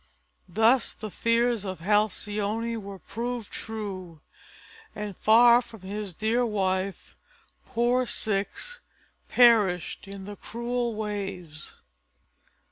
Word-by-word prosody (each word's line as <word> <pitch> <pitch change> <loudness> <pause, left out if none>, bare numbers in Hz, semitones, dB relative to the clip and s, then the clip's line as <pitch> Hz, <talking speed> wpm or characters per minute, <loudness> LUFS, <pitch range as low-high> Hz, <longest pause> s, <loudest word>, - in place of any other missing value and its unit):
Thus 225 +7 +3
the 215 -2 -7
fears 230 0 +1
of 190 -2 -5
Halcyone 210 +3 0
were 200 -1 -8
proved 235 +3 -5
true, 190 -7 -6 0.8
and 210 -2 -5
far 235 +4 +6
from 230 -4 -13
his 200 +1 -5
dear 220 +7 +1
wife 195 -3 -1 0.5
poor 245 +2 +1
Ceyx 215 - -1 0.5
perished 210 -8 +4
in 195 -1 -8
the 205 0 -8
cruel 235 0 -3
waves. 195 -7 -6
215 Hz, 100 wpm, -27 LUFS, 195-235 Hz, 0.8 s, far